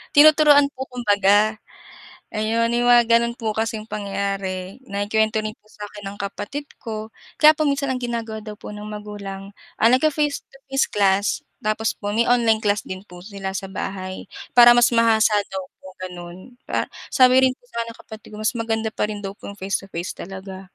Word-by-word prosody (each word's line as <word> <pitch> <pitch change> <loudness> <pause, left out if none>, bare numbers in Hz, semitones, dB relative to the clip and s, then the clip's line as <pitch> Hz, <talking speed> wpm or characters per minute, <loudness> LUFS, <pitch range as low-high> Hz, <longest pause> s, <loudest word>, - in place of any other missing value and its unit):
tinuturuan 295 -1 +7
po 260 +1 -5
kumbaga. 210 -2 +3 0.8
Ayon, 225 +2 +1
may 240 +1 0
mga 240 -1 +6
gano'n 235 0 0
po 220 -2 -2
kasing 220 -1 -2
pangyayari, 195 0 -4
naikuwento 220 0 0
rin 215 0 -4
po - - -44
sa 210 0 -8
akin 205 0 -12
ng 205 - -12
kapatid 205 +8 -5 0.2
ko 220 -2 -5 0.3
kaya 305 0 +8
po 310 - 0
minsan 280 -1 0
ang 255 - -4
ginagawa 230 -3 -4
daw 210 -1 -8
po - - -8
ng 210 - -8
magulang, 205 -2 -7 0.3
ah, 225 - +5
ngfi-face 295 +2 +1
to 270 - -20
face 270 +1 +1
class 200 0 +2 0.4
tapos 215 +1 0
po 205 -1 -4
may 230 +3 +1
online 230 -3 +3
class 205 -1 0
din 185 0 -7
po 175 0 -12
sila 195 -1 -6
sa 195 - -3
bahay, 185 -1 -5 0.3
para 240 -1 +9
mas 240 0 +5
mahasa 225 -2 +4
daw 190 0 -5 0.2
po - - -20 0.2
gano'n, 180 +5 -9
pa - - 0 0.2
sabi 255 0 +5
rin 260 - +2
po - - -47
sa'kin 235 0 -3
ng - - -21
kapatid 220 -1 -12
ko - - -9
mas 215 - +2
maganda 225 -1 -1
pa 210 - -1
rin 210 -1 -6
daw 195 - -4
po - - -12
yung 200 - -9
face 195 +1 -1
to 195 - -13
face 170 0 -4
talaga. 190 0 -8
215 Hz, 195 wpm, -22 LUFS, 200-235 Hz, 0.8 s, para